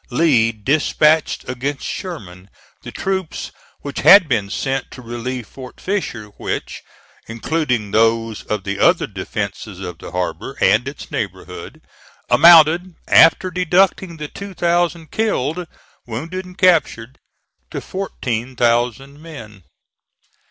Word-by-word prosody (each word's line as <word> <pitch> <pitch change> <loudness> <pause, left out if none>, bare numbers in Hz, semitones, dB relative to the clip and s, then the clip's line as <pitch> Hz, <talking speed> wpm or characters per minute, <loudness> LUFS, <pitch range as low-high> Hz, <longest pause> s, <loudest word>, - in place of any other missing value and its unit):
Lee 125 -5 +3
dispatched 150 +6 +1
against 130 +3 -4
Sherman 95 - -7 0.3
the - - -9
troops 190 -3 -3 0.3
which 140 - -5
had 195 -3 +8
been 110 -7 0
sent 135 +4 -2
to - - -12
relieve 120 +1 -5
Fort 130 -2 -12
Fisher, 150 - -3
which, - - -4 0.5
including 120 -2 -2
those 115 0 +1
of 105 -2 -2
the 100 0 -4
other 175 0 +4
defences 100 0 -6
of 90 -3 -7
the - - -9
harbor 90 0 -4
and 120 +5 +3
its 140 - -8
neighborhood, - - -6 0.5
amounted, 170 +5 +6
after 175 +3 +5
deducting 180 0 +1
the 150 -1 -5
two 200 +4 -9
thousand 170 -2 0
killed, 175 - -1 0.4
wounded 165 +11 -5
and 180 0 -14
captured, 155 - +2 0.5
to - - -5
fourteen 130 - -4
thousand 120 +4 0
men. 115 - -11
135 Hz, 120 wpm, -19 LUFS, 115-170 Hz, 0.5 s, had